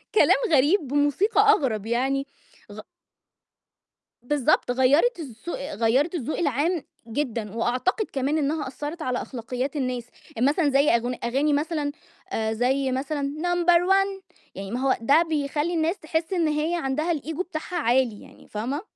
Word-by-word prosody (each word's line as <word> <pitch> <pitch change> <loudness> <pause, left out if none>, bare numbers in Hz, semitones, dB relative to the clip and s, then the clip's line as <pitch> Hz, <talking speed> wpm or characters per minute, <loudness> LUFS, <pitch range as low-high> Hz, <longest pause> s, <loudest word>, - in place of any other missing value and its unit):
كلام - - +6 0.2
غريب 295 +4 +3
بموسيقى 290 - +2
أغرب 250 - 0
يعني 265 +4 0 0.4
غ - - -9 1.4
بالضبط 285 0 +1
غيّرت 280 - +3
الزو 285 +2 -7
غيّرت 270 - 0
الذوق 305 -2 -3
العام 310 +2 0 0.2
جدًا، 230 -4 -3
وأعتقد 255 - 0
كمان 275 +3 0
إنها 300 0 -1
أثرّت 295 +5 -6
على 255 -4 -1
أخلاقيات 255 +3 -4
الناس، 255 -4 -2 0.3
يعني 240 +3 +2
مثلًا 295 +1 +2
زي 280 +2 +3
أغن 240 +2 -1
أغاني 275 +5 +1
مثلًا 295 0 -1 0.6
زي 260 +4 +1
مثلًا 280 +2 -2
"number 350 0 +3
one" 390 0 +1 0.3
يعني 195 +1 -6
ما 245 - -2
هو 265 0 +2
ده 280 +8 +5
بيخلّي 295 +2 -1
الناس 330 +3 0
تحس 320 +2 -2
إن 340 -3 +2
هي 305 +3 0
عندها 310 +2 -1
الEgo 315 +2 -4
بتاعها 350 -1 -6
عالي 245 -7 +1
يعني، - - -16
فاهمة؟ 245 +8 -3
285 Hz, 140 wpm, -25 LUFS, 255-320 Hz, 1.4 s, كلام